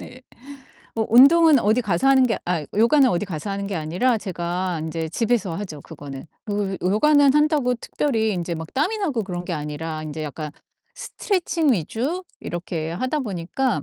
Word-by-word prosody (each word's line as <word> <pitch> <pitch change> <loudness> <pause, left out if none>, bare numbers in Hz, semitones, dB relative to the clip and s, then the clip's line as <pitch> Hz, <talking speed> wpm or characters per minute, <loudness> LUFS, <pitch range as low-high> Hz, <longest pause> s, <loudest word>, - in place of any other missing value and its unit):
네. 255 - -12 0.7
어 220 - +1
운동은 290 +4 +7
어디 220 +3 +2
가서 200 +5 +1
하는 270 -1 +6
게 230 - -1
아 170 -4 -1
요가는 245 +6 +5
어디 175 -2 0
가서 175 +2 -5
하는 200 0 -3
게 195 -2 -3
아니라 180 +11 +1
제가 180 -1 -3
인제 160 0 -3
집에서 215 -3 0
하죠, 165 -7 -6
그거는. 145 -3 -9 0.2
그리고 205 -2 -2
요가는 285 +5 +4
한다고 300 -4 +3
특별히 230 -2 -1
인제 175 -2 -3
막 160 0 -7
땀이 360 +11 0
나고 290 - -1
그런 180 -2 -5
게 175 - -4
아니라 155 +1 -4
인제 155 0 -5
약간 150 +1 -5 0.4
스트레칭 340 - 0
위주 245 - -2 0.2
이렇게 170 -2 -4
하다 255 - -2
보니까 200 - -2
200 Hz, 350 characters per minute, -22 LUFS, 165-260 Hz, 0.7 s, 운동은